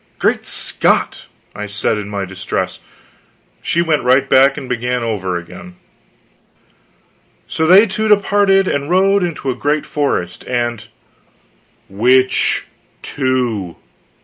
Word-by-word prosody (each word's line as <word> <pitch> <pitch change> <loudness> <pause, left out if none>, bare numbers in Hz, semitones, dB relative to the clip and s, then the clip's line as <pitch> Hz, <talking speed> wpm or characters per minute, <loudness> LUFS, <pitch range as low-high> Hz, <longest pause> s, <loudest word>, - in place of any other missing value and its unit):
"Great - - 0
Scott!" - - 0 0.3
I 105 +1 -6
said 105 +1 -1
in 100 -1 -7
my 100 -1 -3
distress. 95 +1 -4 0.8
She 170 - 0
went 160 -3 +1
right 130 +2 +3
back 135 +1 +4
and 135 - -7
began 125 0 -2
over 95 -6 -2
again: 85 +1 -11 1.7
"So 160 - -1
they 190 +5 +7
two 215 +1 -2
departed 200 -2 +3
and 140 -2 -2
rode 195 +2 +3
into 160 -6 -3
a - - -5
great 145 +3 -1
forest. 115 -12 -2
And 120 -2 -2 0.5
" - - -39
"Which 125 +6 +2 0.4
two?" 125 - -2
130 Hz, 120 wpm, -16 LUFS, 105-160 Hz, 1.7 s, they